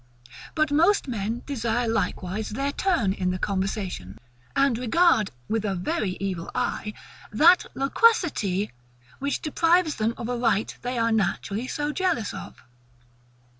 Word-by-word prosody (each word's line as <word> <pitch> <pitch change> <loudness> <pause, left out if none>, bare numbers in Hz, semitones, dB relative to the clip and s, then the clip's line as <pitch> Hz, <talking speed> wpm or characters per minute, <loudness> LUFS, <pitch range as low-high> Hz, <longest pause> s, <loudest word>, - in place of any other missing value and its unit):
But 310 -2 +2
most 335 +5 +3
men 230 0 -3
desire 240 -3 -1
likewise 210 -1 -2
their 275 +6 -2
turn 280 - +1
in 180 -1 -1
the 180 - -1
conversation, 190 - -3 0.4
and 275 -3 +3
regard, 250 - +3 0.2
with 220 -1 -1
a 200 -2 -1
very 185 - -2
evil 185 -4 -3
eye, 210 0 -2 0.4
that 330 +11 +5
LOQUACITY 275 - +2 0.5
which 280 +1 -2
deprives 330 +1 +2
them 225 +2 0
of 230 - -5
a 245 - -1
right 225 -3 +1
they 245 0 -3
are 230 0 +2
naturally 220 +1 -1
so 295 +2 -2
jealous 345 - 0
of. - - -9
230 Hz, 135 wpm, -25 LUFS, 200-290 Hz, 0.5 s, that